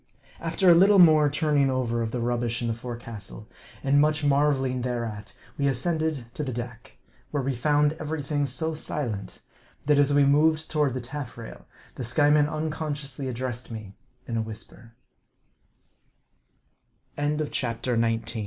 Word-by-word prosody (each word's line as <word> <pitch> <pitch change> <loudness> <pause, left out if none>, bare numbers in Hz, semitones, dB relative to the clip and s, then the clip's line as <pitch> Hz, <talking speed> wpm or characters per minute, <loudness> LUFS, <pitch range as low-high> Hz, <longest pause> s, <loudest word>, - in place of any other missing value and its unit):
After 170 +3 0
a 175 - +9
little 195 +4 +6
more 155 -4 +7
turning 145 -2 +2
over 120 -3 -1
of 115 - -1
the 120 - -3
rubbish 120 0 -1
in 120 - -2
the 115 - 0
fore 120 +1 -6
castle, 110 -2 -8 0.4
and 140 +1 +4
much 150 0 +2
marveling 140 -3 +2
thereat, 115 -4 -4 0.2
we 140 - +2
ascended 155 0 -1
to 150 - -4
the 135 - -3
deck; 120 +1 -7 0.4
where 145 -2 -2
we 135 +1 0
found 145 +4 +2
every 155 -1 -3
thing 145 0 -1
so 160 +5 -1
silent, 125 -9 -4 0.4
that, 145 0 +4
as 145 0 +4
we 145 0 +5
moved 155 +3 +3
toward 150 -4 +1
the 130 - -3
taffrail, 120 -3 -8 0.3
the - - -6
Skyeman 145 +4 +3
unconsciously 150 -3 -4
addressed 125 0 -4
me 110 -4 -8 0.3
in 115 - -3
a 110 - 0
w 110 -1 -6
140 Hz, 145 wpm, -26 LUFS, 120-150 Hz, 0.4 s, a